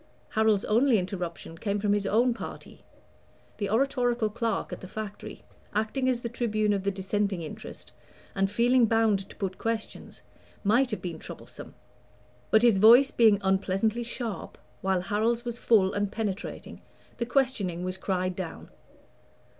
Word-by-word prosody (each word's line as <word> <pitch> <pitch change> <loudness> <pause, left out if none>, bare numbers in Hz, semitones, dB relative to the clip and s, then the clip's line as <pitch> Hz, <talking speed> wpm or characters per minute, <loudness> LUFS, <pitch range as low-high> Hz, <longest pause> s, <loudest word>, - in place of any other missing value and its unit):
Harold's 220 -2 +2
only 235 +2 +4
interruption 180 -3 -4
came 200 +4 -2
from 205 0 +1
his 205 -1 0
own 235 +4 +3
party. - - -9 0.8
The 205 - -1
oratorical 245 -1 +1
clerk 225 -1 -2
at - - -7
the 185 - -8
Factory, 210 +1 -7 0.3
acting 220 +5 0
as 245 -2 0
the 235 - -3
tribune 215 -3 0
of 200 - -1
the 200 - 0
Dissenting 195 -1 -1
interest, 155 - -9 0.4
and 195 0 +1
feeling 235 +3 +3
bound 215 -3 +2
to - - -13
put 190 -3 -4
questions, 225 -1 -4 0.4
might 235 +5 +3
have 215 - -4
been 175 -2 -5
troublesome; - - -10 0.7
but 220 +1 +4
his 230 -5 +5
voice 240 +6 +7
being 220 -3 +5
unpleasantly 195 +4 +1
sharp, 230 -4 -5 0.2
while 190 -1 +1
Harold's 225 +5 0
was 240 0 -4
full 195 -5 +3
and 205 -1 -1
penetrating, 215 -1 -5 0.4
the 235 - -1
questioning 230 -9 0
was 185 0 -3
cried 185 -1 -1
down. 180 -3 -7
215 Hz, 150 wpm, -27 LUFS, 195-235 Hz, 0.8 s, voice